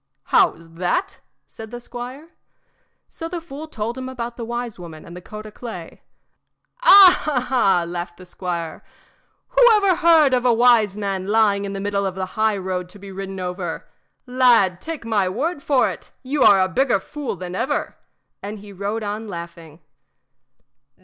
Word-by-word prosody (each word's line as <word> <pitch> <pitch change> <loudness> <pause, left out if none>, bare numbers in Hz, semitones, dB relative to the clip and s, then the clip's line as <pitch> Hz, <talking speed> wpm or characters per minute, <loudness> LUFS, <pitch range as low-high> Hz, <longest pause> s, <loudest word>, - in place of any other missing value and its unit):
"How's 165 +1 +3
that?" 360 - -1 0.3
said 220 -1 -11
the 240 +1 -7
squire. 250 +6 -9 0.8
So 330 - -7
the 350 0 -4
fool 315 -1 -9
told 235 -2 -4
him 260 0 -5
about 240 -2 -5
the 235 - -6
wise 240 -2 -5
woman 165 -3 -10
and 170 - -11
the 180 - -9
coat 215 +3 -9
o' 215 - -9
clay. 205 -7 -9 0.8
"Ah, 360 - +7
ah!" 195 -9 +3
laughed 175 0 -6
the 185 - -13
squire, 175 -2 -5 0.7
"whoever 445 -7 +5
heard 325 -5 +5
of 250 -1 +2
a 250 - +4
wise 230 -4 +4
man 195 -2 -3
lying 205 -2 +2
in 200 - -5
the 195 - -4
middle 200 0 -1
of 185 - -5
the 190 -1 -3
highroad 190 -4 -1
to 205 - -13
be 200 0 -11
ridden 195 0 -6
over? 180 0 -5 0.4
Lad, 240 -8 +3
take 320 -7 -6
my 205 -5 +1
word 285 - -2
for 275 -2 +2
it, - - -11
you 275 +2 -2
are 200 -5 +7
a 185 - +3
bigger 240 +2 +1
fool 285 +4 -6
than 180 0 -7
ever," - - -2 0.5
and 205 +2 -6
he 205 0 -12
rode 205 +4 -3
on 210 +2 -4
laughing. 170 -3 -9
215 Hz, 170 wpm, -21 LUFS, 185-255 Hz, 0.8 s, Ah